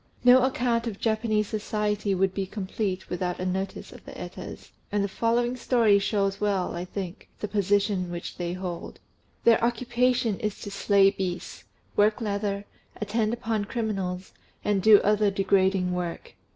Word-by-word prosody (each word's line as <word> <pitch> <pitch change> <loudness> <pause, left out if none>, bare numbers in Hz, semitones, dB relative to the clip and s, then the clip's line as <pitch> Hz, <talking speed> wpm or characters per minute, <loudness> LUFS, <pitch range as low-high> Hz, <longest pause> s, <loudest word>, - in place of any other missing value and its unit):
No 250 +1 +8
account 245 -3 +1
of 215 -3 -5
Japanese 220 -1 +1
society 210 -1 -1
would 190 0 +1
be 195 -1 -2
complete 195 -1 -3
without 180 0 -3
a 185 - -2
notice 190 +1 -3
of - - -13
the - - -10
Etas; - - -8 0.2
and 205 0 +1
the - - 0
following 235 +4 0
story 230 -5 +3
shows 195 -1 0
well, 200 -3 0
I 175 +1 -4
think, 185 -1 -6
the 210 - -3
position 200 -2 +1
which 175 0 -6
they 175 -1 -2
hold. 180 -2 -6 0.4
Their 230 -1 +5
occupation 240 -1 +1
is 215 -3 -3
to 205 - -6
slay 200 0 +4
beasts, 185 -3 -5 0.3
work 210 +2 +3
leather, 200 -2 -2 0.3
attend 215 +1 0
upon 225 -3 -1
criminals, 195 -5 -3 0.3
and 205 -2 +2
do 215 0 +8
other 210 0 +3
degrading 190 -1 +2
work. 175 -2 -4
205 Hz, 155 wpm, -26 LUFS, 190-220 Hz, 0.4 s, No